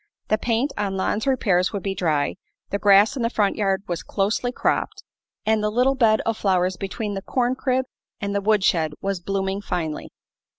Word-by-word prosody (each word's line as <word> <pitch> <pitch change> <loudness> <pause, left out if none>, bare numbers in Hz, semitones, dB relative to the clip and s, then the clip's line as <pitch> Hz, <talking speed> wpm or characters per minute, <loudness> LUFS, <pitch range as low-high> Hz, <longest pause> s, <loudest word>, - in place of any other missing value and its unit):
The 215 - +2
paint 240 +5 0
on 195 -2 -1
Lon's 210 +5 -1
repairs 195 -9 +2
would 200 -3 -4
be 195 - -1
dry, 155 -6 0 0.4
the 200 - -1
grass 205 +4 +5
in 260 - -3
the 230 - +1
front 205 -4 +1
yard 195 -2 0
was 175 -2 -3
closely 215 +5 -1
cropped, - - -1 0.4
and 220 0 +2
the 210 - +2
little 250 +5 +3
bed 225 -5 +3
of 225 -1 -1
flowers 185 -2 +1
between 205 +3 -4
the 195 - -4
corn 245 +4 0
crib 260 0 0 0.3
and 200 -2 -3
the 200 - 0
wood 210 -1 +2
shed 160 -5 +2
was 195 -1 -2
blooming 195 +1 -2
finely. 160 -6 -3
200 Hz, 195 wpm, -23 LUFS, 190-225 Hz, 0.4 s, grass